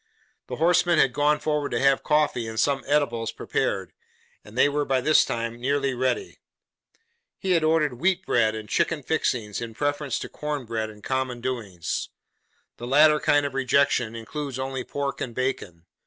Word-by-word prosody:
The - - -4
horseman 175 +1 +3
had 135 -4 +4
gone 150 +1 +2
forward 150 -2 -1
to - - +1
have 135 0 +3
coffee 150 -6 +1
and 110 0 -4
some 135 -1 +1
eatables 120 -6 +1
prepared, - - -2 0.5
and 105 +3 -13
they - - +6
were 145 +1 0
by 135 -2 +1
this 155 +5 +4
time 115 0 -4
nearly 140 +1 0
ready. 130 - -2 1.0
He 190 - -2
had 165 -3 +3
ordered 155 -5 +1
'wheat 185 +3 +1
bread 110 -2 +2
and 110 -1 -7
chicken 150 +6 0
fixings,' 120 -9 -1
in 115 -1 -6
preference 145 -1 -1
to - - -5
'corn 150 -3 -4
bread 110 -1 -3
and 105 -1 -14
common 130 -1 -2
doings.' 105 -10 -4 0.7
The 120 - -7
latter 150 +3 +5
kind 145 -1 +3
of 140 - -3
rejection 130 -3 +1
includes 135 +4 -5
only 130 -1 -3
pork 140 +2 -4
and 120 -2 -4
bacon. 100 -10 -3
135 Hz, 170 wpm, -25 LUFS, 115-150 Hz, 1.0 s, they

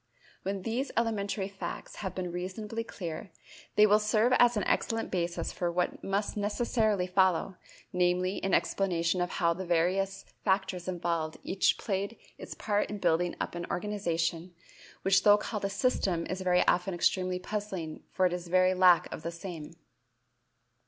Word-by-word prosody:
When 195 0 -3
these 240 +6 -1
elementary 205 -4 0
facts 195 -1 -7
have 190 -3 -5
been 185 - -2
made 175 - -5
reasonably 210 +5 -4
clear, 175 -3 -6 0.5
they 210 - +7
will 210 0 +5
serve 215 +3 +2
as 240 -2 +5
an 205 - +1
excellent 225 +4 0
basis 175 -2 -1
for 175 -1 -2
what 180 +1 -1
must 200 +2 -1
necessarily 210 -1 +1
follow, 185 0 +2 0.4
namely, 180 +1 +1
an 195 - 0
explanation 180 -2 +1
of 175 - 0
how 170 -2 +1
the 185 +3 -5
various 185 +3 0 0.2
factors 190 -2 0
involved 170 -3 -2
each 190 0 +2
played 200 +2 -3 0.2
its - - -8
part 205 -1 0
in 210 - -4
building 175 -1 +1
up - - -3
an 175 0 -5
organization 175 -3 -2 0.5
which 195 0 +4
though 205 0 +7
called 210 -1 -4
a - - 0
system 200 -5 0
is 185 +1 -4
very 180 -1 +3
often 180 +1 +2
extremely 185 +1 +1
puzzling 185 -4 -5
for 185 - +2
its 180 -1 -1
very 185 +1 +4
lack 180 -2 +6
of - - -6
the 165 - -3
same. 170 -2 -8
185 Hz, 160 wpm, -30 LUFS, 175-205 Hz, 0.5 s, they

